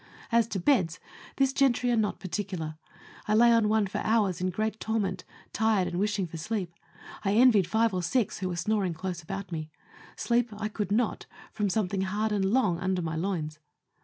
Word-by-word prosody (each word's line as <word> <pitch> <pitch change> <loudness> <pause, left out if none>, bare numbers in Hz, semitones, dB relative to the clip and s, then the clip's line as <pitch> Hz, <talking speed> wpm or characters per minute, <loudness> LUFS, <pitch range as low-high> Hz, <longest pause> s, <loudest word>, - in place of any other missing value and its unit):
As 230 0 +4
to 200 -4 -3
beds, 180 - +2 0.4
this 270 -1 +2
gentry 250 -3 +2
are - - +3
not 215 -2 0
particular. 180 -3 -4 0.5
I 215 - +2
lay 235 +2 +6
on 230 -2 +4
one 215 -1 +3
for 195 - -4
hours 205 -6 +1
in 185 - +1
great 215 +4 -2
torment, 210 -4 -1 0.3
tired 215 -4 +2
and 175 0 -3
wishing 205 -1 0
for 165 -1 -8
sleep; 180 0 -3 0.5
I 195 -1 +1
envied 225 -6 +5
five 220 +2 +2
or 180 - 0
six 220 +5 0
who 185 -1 -2
were 175 - -3
snoring 190 -1 0
close 180 0 -4
about 195 +3 -6
me. 155 -2 -4 0.5
Sleep 240 0 +1
I 215 0 -3
could 210 -2 -4
not, 225 +1 0 0.3
from 210 -1 0
something 195 -1 0
hard 205 +3 -1
and 200 -2 +1
long 200 -5 +2
under 185 -1 -1
my 160 0 -3
loins. 160 -3 -3
200 Hz, 190 wpm, -28 LUFS, 180-220 Hz, 0.5 s, lay